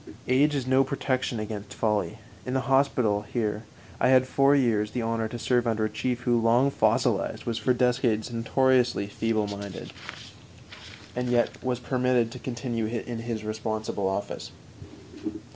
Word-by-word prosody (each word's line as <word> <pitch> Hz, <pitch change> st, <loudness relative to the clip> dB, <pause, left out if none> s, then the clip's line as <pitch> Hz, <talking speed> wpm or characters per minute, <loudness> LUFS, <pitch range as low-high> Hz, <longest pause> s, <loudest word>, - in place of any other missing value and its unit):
Age 145 Hz, +4 st, +3 dB
is 135 Hz, -3 st, -1 dB
no 130 Hz, +1 st, +4 dB
protection 130 Hz, -3 st, -1 dB
against 105 Hz, -1 st, -6 dB
folly. 105 Hz, -3 st, 0 dB, 0.3 s
In 130 Hz, -, -3 dB
the 130 Hz, -, +2 dB
hospital 130 Hz, -6 st, +2 dB
here 105 Hz, 0 st, -3 dB, 0.3 s
I -, -, +3 dB
had 130 Hz, 0 st, +5 dB
for 140 Hz, +2 st, +4 dB
years 115 Hz, -6 st, +2 dB
the 120 Hz, +2 st, -3 dB
honor 115 Hz, 0 st, -1 dB
to 120 Hz, -, -6 dB
serve 120 Hz, 0 st, +1 dB
under 110 Hz, -1 st, +1 dB
a 110 Hz, -, -3 dB
chief 120 Hz, +3 st, -2 dB
who, 120 Hz, -2 st, +2 dB
long 120 Hz, +5 st, +4 dB
fossilized, -, -, +1 dB
was 115 Hz, -1 st, -2 dB
for 110 Hz, -, +1 dB
decades 125 Hz, -3 st, +1 dB
notoriously 125 Hz, -1 st, +2 dB
feebleminded, 100 Hz, -2 st, -3 dB, 1.2 s
and 125 Hz, 0 st, -1 dB, 0.3 s
was 125 Hz, -2 st, -1 dB
yet -, -, -19 dB
permitted 125 Hz, -2 st, +1 dB
to -, -, -8 dB
continue 120 Hz, -3 st, -3 dB
in 115 Hz, +1 st, -4 dB
his 115 Hz, -2 st, -4 dB
responsible 110 Hz, -2 st, -2 dB
office. 95 Hz, +1 st, -4 dB
120 Hz, 150 wpm, -27 LUFS, 110-130 Hz, 1.2 s, had